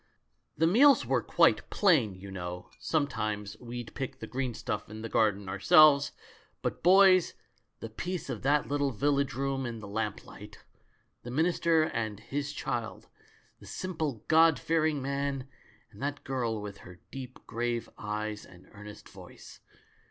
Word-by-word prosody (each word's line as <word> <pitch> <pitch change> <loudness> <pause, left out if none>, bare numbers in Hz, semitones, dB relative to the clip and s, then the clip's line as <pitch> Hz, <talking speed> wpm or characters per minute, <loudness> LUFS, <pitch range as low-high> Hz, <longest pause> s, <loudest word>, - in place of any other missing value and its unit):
The 160 - +3
meals 260 - +5
were - - +1
quite - - +3
plain, 145 - +3
you 95 +1 -10
know 90 -1 -7
— - - -26
sometimes 110 -9 -2
we'd 120 -1 -7
pick 135 -3 -5
the - - -7
green 130 -2 -3
stuff 105 -1 -4
in 110 +1 -8
the 115 - -5
garden 105 -3 +1
ourselves 140 +10 +5 0.3
— - - -33
but, - - -3
boys, 185 -1 +5 0.5
the 115 - -6
peace 180 +8 -4
of - - -5
that 145 +2 +2
little 145 0 0
village 140 +2 0
room 135 0 -1
in 120 -2 -4
the 105 - -9
lamplight! 105 0 -5 0.6
The 120 - -9
minister 165 +3 +2
and 110 -8 -3
his 140 +5 -4
child 120 -5 -4 0.3
— - - -34
the - - -14
simple. 155 - -4
God 160 -1 +5
fearing 155 -3 0
man 140 -1 -2 0.4
and - - -15
that 145 +1 -3
girl 120 -4 -2
with 100 -1 -8
her 90 -1 -13
deep, 130 -2 -8
grave 120 0 -2
eyes, 105 0 -4
and 90 -1 -17
earnest 105 0 -12
voice. - - -13
130 Hz, 160 wpm, -29 LUFS, 105-145 Hz, 0.6 s, meals